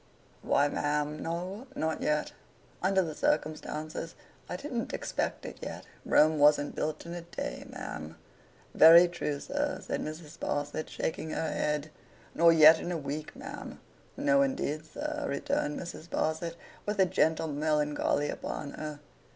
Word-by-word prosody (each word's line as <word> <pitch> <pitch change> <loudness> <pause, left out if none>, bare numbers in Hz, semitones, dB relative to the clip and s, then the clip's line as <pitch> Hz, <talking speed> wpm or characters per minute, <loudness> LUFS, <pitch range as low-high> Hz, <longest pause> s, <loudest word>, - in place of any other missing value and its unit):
'Why, 145 +1 +3
ma'am, 150 +1 -1
no; 185 +9 -4
not 160 0 -1
yet. 150 0 0 0.5
Under 190 0 +3
the 160 -3 -4
circumstances, 155 +1 -2 0.3
I - - -3
didn't 240 +2 -4
expect - - -2
it - - -7
yet. - - -6 0.2
Rome 155 0 +5
wasn't 145 0 +5
built 155 +2 -3
in 170 - -6
a 175 - -5
day, 170 +1 -6
ma'am.' 80 +2 -7 0.6
'Very 170 +2 +9
true, 150 -4 -3
sir,' 290 - -2
said - - -2
Mrs. 155 +1 -7
Sparsit, 145 +2 -2
shaking 160 0 -3
her 160 0 -2
head. 150 0 -1 0.4
'Nor 170 0 +6
yet 160 0 +8
in 175 - -4
a 175 - -1
week, 150 +1 -5
ma'am.' - - -8 0.4
'No, 285 0 +4
indeed, 155 - -1
sir,' 300 - -4
returned 145 +1 -1
Mrs. 170 -2 -7
Sparsit, 160 +2 -1 0.3
with 210 0 -1
a 190 - +5
gentle 160 -2 +2
melancholy 150 -1 +1
upon 145 -2 -4
her. 150 -1 -6
155 Hz, 145 wpm, -30 LUFS, 150-175 Hz, 0.6 s, Very